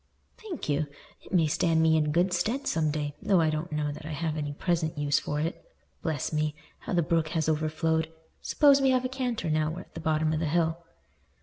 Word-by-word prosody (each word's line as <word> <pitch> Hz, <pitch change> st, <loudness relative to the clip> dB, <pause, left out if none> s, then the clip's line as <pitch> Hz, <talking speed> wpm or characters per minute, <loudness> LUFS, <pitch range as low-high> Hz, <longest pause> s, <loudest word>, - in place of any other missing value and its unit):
"Thank 415 Hz, -7 st, -6 dB
you. 150 Hz, +1 st, +1 dB, 0.4 s
It -, -, -15 dB
may 175 Hz, -4 st, +4 dB
stand 160 Hz, +2 st, +2 dB
me 160 Hz, 0 st, +4 dB
in 150 Hz, -1 st, +2 dB
good 180 Hz, +4 st, +2 dB
stead 225 Hz, +10 st, 0 dB
some 160 Hz, -1 st, +1 dB
day 145 Hz, -1 st, -2 dB
though 195 Hz, -3 st, +3 dB
I 160 Hz, -1 st, +3 dB
don't 155 Hz, +3 st, -3 dB
know 150 Hz, -1 st, -1 dB
that 145 Hz, -, -9 dB
I 155 Hz, +1 st, -5 dB
have 155 Hz, +1 st, -2 dB
any 145 Hz, -2 st, -3 dB
present 160 Hz, +1 st, -1 dB
use 145 Hz, -1 st, +2 dB
for 150 Hz, -, -3 dB
it. 165 Hz, +3 st, -3 dB, 0.4 s
Bless 160 Hz, -2 st, -2 dB
me! 155 Hz, -1 st, 0 dB, 0.2 s
How -, -, -5 dB
the 175 Hz, -1 st, +3 dB
brook 165 Hz, 0 st, +1 dB
has 160 Hz, -, 0 dB
overflowed. 160 Hz, +1 st, 0 dB, 0.3 s
Suppose 280 Hz, -2 st, +5 dB
we 270 Hz, -, +4 dB
have 255 Hz, -1 st, +2 dB
a -, -, -1 dB
canter, 245 Hz, -, -2 dB
now 155 Hz, 0 st, +1 dB
we're 170 Hz, +3 st, -5 dB
at -, -, -18 dB
the -, -, -6 dB
bottom 155 Hz, -1 st, +1 dB
of 155 Hz, -, 0 dB
the 160 Hz, -, 0 dB
hill." 165 Hz, +1 st, 0 dB
160 Hz, 225 wpm, -28 LUFS, 155-175 Hz, 0.4 s, Suppose